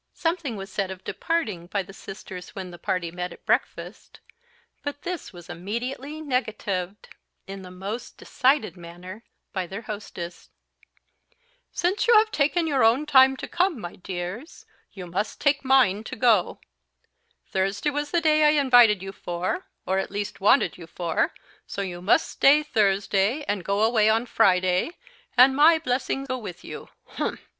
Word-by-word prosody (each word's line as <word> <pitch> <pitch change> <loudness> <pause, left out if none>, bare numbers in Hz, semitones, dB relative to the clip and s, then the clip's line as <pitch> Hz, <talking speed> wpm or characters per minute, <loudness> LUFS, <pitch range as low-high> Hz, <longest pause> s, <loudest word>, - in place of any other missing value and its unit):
Something 330 -7 -1
was 195 -1 -8
said 195 -2 -2
of 190 -1 -8
departing 215 - -2
by 200 +1 -1
the 195 - -13
sisters 190 -2 -10
when 185 -2 -6
the 175 - -11
party 175 -3 -2
met 180 +1 -5
at - - -14
breakfast; - - -2 0.6
but 290 0 -6
this 355 -2 -5
was 175 -2 -13
immediately 250 - -5
negatived 210 - -3 0.4
in 195 0 -8
the 185 - -10
most 195 +6 -6
decided 265 -5 +1
manner 180 +5 -10 0.3
by 190 -3 -2
their 195 +6 -7
hostess. 190 -5 -7 1.2
"Since 365 +6 0
you 470 - +6
have 435 +1 +4
taken 315 +2 +1
your 280 -6 +2
own 235 +7 +4
time 265 -2 +6
to - - -6
come, 350 -5 0
my 175 -4 -7
dears, 185 - -7 0.3
you 190 -3 -8
must 185 +5 -3
take 285 -1 +2
mine 255 -7 +4
to - - -6
go. 225 -6 +2 0.9
Thursday 195 +9 0
was 290 +1 -3
the 340 +3 +1
day 310 -1 +4
I 300 0 +5
invited 245 -8 +5
you 195 - -5
for, 175 -1 -4 0.2
or 190 +1 +1
at - - -3
least 205 0 -5
wanted 210 0 +3
you 170 - -10
for, 170 -1 -1 0.4
so 200 - -4
you 175 -2 -6
must 190 - +3
stay 295 +2 +4
Thursday, 205 0 +1
and 205 -7 -2
go 200 +3 0
away 220 -1 +4
on 225 +2 +2
Friday, 185 - +2 0.4
and 260 +2 +7
my 315 +3 +6
blessing 270 -2 -2
go 255 -1 -3
with 180 -6 -8
you - - -9 0.2
humph!" - - -4
215 Hz, 165 wpm, -25 LUFS, 185-275 Hz, 1.2 s, and